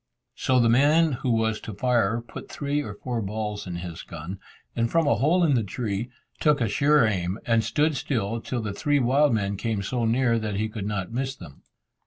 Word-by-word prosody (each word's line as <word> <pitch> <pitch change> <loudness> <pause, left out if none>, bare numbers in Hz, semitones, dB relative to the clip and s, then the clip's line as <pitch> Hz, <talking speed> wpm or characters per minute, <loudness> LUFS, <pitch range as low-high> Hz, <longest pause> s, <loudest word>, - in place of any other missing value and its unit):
So 130 -1 +1
the 120 - +4
man 150 +7 +4
who 125 0 -3
was 110 -1 +1
to 110 - -7
fire 115 -1 +1
put - - -9
three 145 0 -1
or 105 -6 -6
four 120 +1 -3
balls 105 0 -4
in 90 - -4
his 85 -1 -6
gun, 85 +4 -8 0.4
and 115 0 +1
from 165 -1 +2
a 145 - +4
hole 155 - +2
in 155 -4 +3
the 120 - +3
tree, 105 +2 -3 0.3
took 150 -2 +3
a 115 - +1
sure 140 +6 +4
aim, 95 -2 -1
and 115 -1 +2
stood 150 +7 +1
still 115 -5 -2
till 120 -1 -3
the 105 -2 -3
three 145 +8 +1
wild 135 +3 +3
men 100 -3 0
came 105 -1 -2
so 120 +3 -1
near 115 0 +2
that 105 -2 -3
he 110 +2 -1
could 105 -2 -5
not 100 -2 -3
miss 130 +2 -2
them. 70 - -13
115 Hz, 215 wpm, -25 LUFS, 105-135 Hz, 0.4 s, the